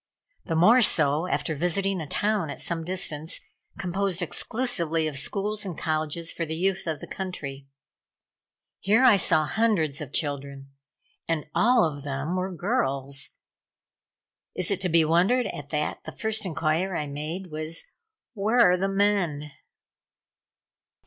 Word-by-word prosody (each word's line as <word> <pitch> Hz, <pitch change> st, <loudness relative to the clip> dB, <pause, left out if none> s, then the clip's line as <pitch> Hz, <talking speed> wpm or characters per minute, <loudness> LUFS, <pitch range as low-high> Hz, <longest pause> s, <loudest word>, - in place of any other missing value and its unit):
The 165 Hz, -, -2 dB
more 220 Hz, +10 st, +6 dB
so 155 Hz, -4 st, +3 dB
after 165 Hz, -, -1 dB
visiting 180 Hz, +4 st, 0 dB
a 155 Hz, -, -6 dB
town 205 Hz, -1 st, 0 dB
at -, -, -6 dB
some 165 Hz, -1 st, -3 dB
distance, 160 Hz, -3 st, -3 dB, 0.4 s
composed 185 Hz, 0 st, -1 dB
exclusively 170 Hz, -6 st, 0 dB
of 155 Hz, -2 st, -3 dB
schools 205 Hz, +9 st, -2 dB
and 185 Hz, -5 st, -6 dB
colleges 155 Hz, +1 st, -1 dB
for 170 Hz, -, -3 dB
the 160 Hz, 0 st, -3 dB
youth 190 Hz, +2 st, -1 dB
of 155 Hz, -3 st, -3 dB
the -, -, -6 dB
country. 140 Hz, -8 st, -6 dB, 1.1 s
Here 215 Hz, +6 st, +3 dB
I 240 Hz, -6 st, +7 dB
saw 155 Hz, -4 st, +3 dB
hundreds 165 Hz, -8 st, +1 dB
of 145 Hz, -, -7 dB
children 140 Hz, -2 st, -3 dB, 0.6 s
and 165 Hz, -2 st, -1 dB
all 240 Hz, -1 st, +4 dB
of 145 Hz, -3 st, -4 dB
them 145 Hz, +4 st, -3 dB
were 185 Hz, +1 st, -2 dB
girls. 140 Hz, -, -1 dB, 1.3 s
Is 185 Hz, +1 st, +1 dB
it 195 Hz, -, -1 dB
to 185 Hz, -, +2 dB
be 165 Hz, -1 st, +4 dB
wondered 185 Hz, +11 st, +3 dB
at 145 Hz, -1 st, -6 dB
that 150 Hz, -1 st, -2 dB
the 160 Hz, -, -7 dB
first 220 Hz, +6 st, -1 dB
inquiry 165 Hz, +2 st, 0 dB
I 150 Hz, -, -2 dB
made, 155 Hz, +6 st, -5 dB
was: 155 Hz, +2 st, -2 dB, 0.5 s
"Where 220 Hz, +3 st, +1 dB
are 180 Hz, -, +3 dB
the 195 Hz, +2 st, 0 dB
men?" 195 Hz, -7 st, 0 dB
170 Hz, 145 wpm, -26 LUFS, 150-195 Hz, 1.3 s, I